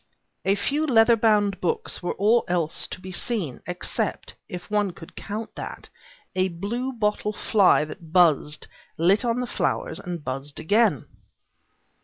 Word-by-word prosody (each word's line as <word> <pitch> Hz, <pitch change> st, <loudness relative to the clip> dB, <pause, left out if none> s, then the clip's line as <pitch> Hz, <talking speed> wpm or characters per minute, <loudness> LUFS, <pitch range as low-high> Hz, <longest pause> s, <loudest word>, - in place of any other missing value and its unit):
A 195 Hz, -, +3 dB
few 290 Hz, +9 st, 0 dB
leather 235 Hz, -2 st, +6 dB
bound 210 Hz, -3 st, +2 dB
books 455 Hz, -1 st, -1 dB
were 175 Hz, -, -2 dB
all 220 Hz, +4 st, +3 dB
else 170 Hz, -3 st, -1 dB
to -, -, -7 dB
be 185 Hz, +1 st, -8 dB
seen, 180 Hz, -, -2 dB
except 180 Hz, 0 st, -2 dB, 0.2 s
if 180 Hz, -, -7 dB
one 205 Hz, -3 st, +1 dB
could 165 Hz, -, -13 dB
count 215 Hz, +2 st, -5 dB
that -, -, -7 dB, 0.5 s
a 185 Hz, 0 st, +2 dB
bluebottle 210 Hz, +3 st, -2 dB
fly 200 Hz, -8 st, +4 dB
that 160 Hz, +1 st, -11 dB
buzzed, 160 Hz, -4 st, +3 dB, 0.3 s
lit 185 Hz, +7 st, +4 dB
on 240 Hz, +1 st, 0 dB
the -, -, -1 dB
flowers, -, -, -1 dB
and 175 Hz, -4 st, -6 dB
buzzed 135 Hz, +2 st, -4 dB
again. 205 Hz, -, +2 dB
200 Hz, 145 wpm, -25 LUFS, 175-225 Hz, 0.5 s, leather